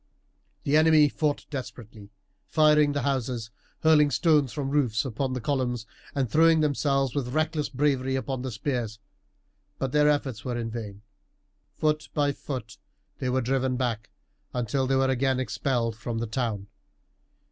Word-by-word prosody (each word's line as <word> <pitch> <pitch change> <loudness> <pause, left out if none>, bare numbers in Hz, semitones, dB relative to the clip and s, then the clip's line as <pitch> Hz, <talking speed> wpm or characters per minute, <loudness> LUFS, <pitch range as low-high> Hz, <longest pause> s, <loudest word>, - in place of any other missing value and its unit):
The 140 - +1
enemy 155 -2 +6
fought 150 0 -1
desperately, 115 -6 -8 0.4
firing 150 -2 +4
the 145 - -1
houses, 125 -5 -2 0.3
hurling 155 -2 +5
stones 150 -2 +3
from 140 -3 -3
the - - -4
roofs 125 -6 +1
upon 130 +1 -2
the 130 - -2
columns, 125 -3 -1 0.3
and 135 -2 +1
throwing 160 +6 +4
themselves 140 -3 +1
with 130 -2 -3
reckless 155 -1 0
bravery 135 -1 0
upon 130 -1 -3
the 130 - -3
spears, 115 -1 -3 0.8
but 135 -1 -2
their 150 +1 +4
efforts 135 -6 -1
were 125 -2 -3
in 115 -1 -3
vain. 105 -3 -7 0.7
Foot 155 0 0
by 145 -1 +2
foot 120 -8 -7 0.4
they 130 - -1
were 130 +1 +1
driven 130 +1 0
back, 115 -4 -2 0.5
until 125 +2 0
they 135 - +2
were 135 0 +3
again 130 0 +1
expelled 125 -3 -1
from 115 +1 -4
the 115 - -1
town. 110 -3 -2
130 Hz, 155 wpm, -27 LUFS, 120-145 Hz, 0.8 s, enemy